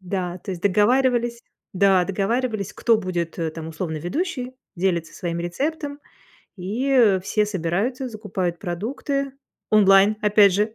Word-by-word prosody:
Да, 180 -1 -3
то - - -5
есть 175 - -7
договаривались 235 +4 +2 0.3
Да, 190 -1 +4
договаривались, 210 +2 -1
кто 230 -2 +3
будет 175 -4 -3 0.2
там, 160 -1 -6
условно, 160 0 -4
ведущей, 250 - -3 0.2
делится 170 -3 -1
своим 170 -1 -3
рецептом, 285 - -3 0.6
и 220 +2 +2
все 210 +2 +1
собираются, 210 +7 -2
закупают 190 -5 -3
продукты 260 - -3 0.4
онлайн, 200 0 +6
опять 205 -2 +5
же. 210 +2 +1
200 Hz, 125 wpm, -23 LUFS, 180-240 Hz, 0.6 s, онлайн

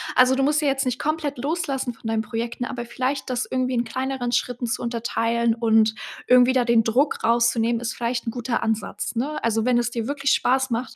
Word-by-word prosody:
Also, 255 +1 +5
du 270 - +1
musst 300 +2 +2
ja 290 - +2
jetzt 270 0 0
nicht 255 0 -2
komplett 300 -3 -2
loslassen 275 -3 -2
von 225 - -10
deinen 225 0 0
Projekten, 230 +3 -4
aber 245 -1 -4
vielleicht 260 +3 -3
das 250 0 -1
irgendwie 255 0 -1
in 235 - +1
kleineren 260 +1 -3
Schritten 245 0 -1
zu 225 - -2
unterteilen 235 -1 0
und 220 -1 +3 0.3
irgendwie 250 0 +6
da 255 -1 +3
den 235 -1 +3
Druck 260 +6 +1
rauszunehmen 235 0 +2
ist 235 - -3
vielleicht 240 0 -2
'n - - 0
guter 240 0 -2
Ansatz, 220 +1 -3
ne? 295 +6 -2
Also, 225 -1 +1
wenn 250 -1 +3
es 240 -1 +1
dir 230 -2 -3
wirklich 285 0 0
Spaß 265 +1 +2
macht, 240 +1 -3
245 Hz, 215 wpm, -23 LUFS, 230-265 Hz, 0.3 s, irgendwie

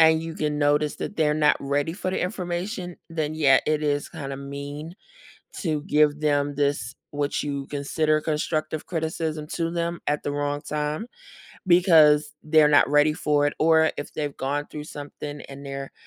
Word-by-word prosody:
and 160 0 +6
you 165 0 -6
can 150 -1 -1
notice 145 +1 +2
that 205 - -5
they're 150 -2 +3
not 150 -1 +4
ready 145 +3 -1
for 185 0 -3
the - - -1
information, 180 0 -3
then 155 -2 -2
yeah, 140 -4 +5
it 155 0 +1
is 145 -1 0
kinda 140 -4 -6
mean 140 +5 -7 0.7
to 155 -5 -1
give 150 0 +3
them 145 -1 +1
this 140 -3 -1 0.2
what 145 0 -1
you 140 -2 -3
consider 155 +2 0
constructive 155 0 -2
criticism 160 -2 -2
to 165 +1 -2
them, 170 0 -2
at 150 0 0
the 145 - -2
wrong 145 0 -1
time, 150 +6 -3 0.6
because 155 -5 +5
they're 155 -1 +5
not 145 -2 +5
ready 150 +1 +4
for 150 -1 +1
it, 145 - -1
or 160 0 +4
if 145 - -6
they've 145 -2 -4
gone 145 +2 -2
through 150 -1 -7
something, 145 0 -8
and 140 +1 -10
they're 135 0 -6
150 Hz, 170 wpm, -25 LUFS, 145-160 Hz, 0.7 s, and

